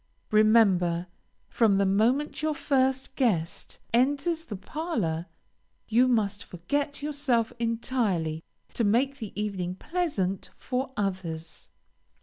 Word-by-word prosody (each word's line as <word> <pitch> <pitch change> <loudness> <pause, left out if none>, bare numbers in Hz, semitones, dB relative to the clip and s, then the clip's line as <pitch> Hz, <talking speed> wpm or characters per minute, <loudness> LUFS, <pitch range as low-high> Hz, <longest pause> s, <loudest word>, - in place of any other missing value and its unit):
Remember, 200 -6 +4 0.4
from 215 -4 +3
the 200 - +3
moment 235 +12 +1
your 310 -1 0
first 265 -1 0
guest 185 - -1 0.2
enters 290 +7 +1
the 210 - -6
parlor, 200 - -3 0.6
you 240 +3 +4
must 205 -5 +1
forget 285 - -3
yourself 280 -6 0
entirely 225 -9 -1 0.3
to 235 - 0
make 260 +7 +2
the 220 -4 -6
evening 190 -4 -2
pleasant 210 - -2
for 260 +1 -3
others. 175 -5 -4
225 Hz, 110 wpm, -27 LUFS, 190-270 Hz, 0.6 s, Remember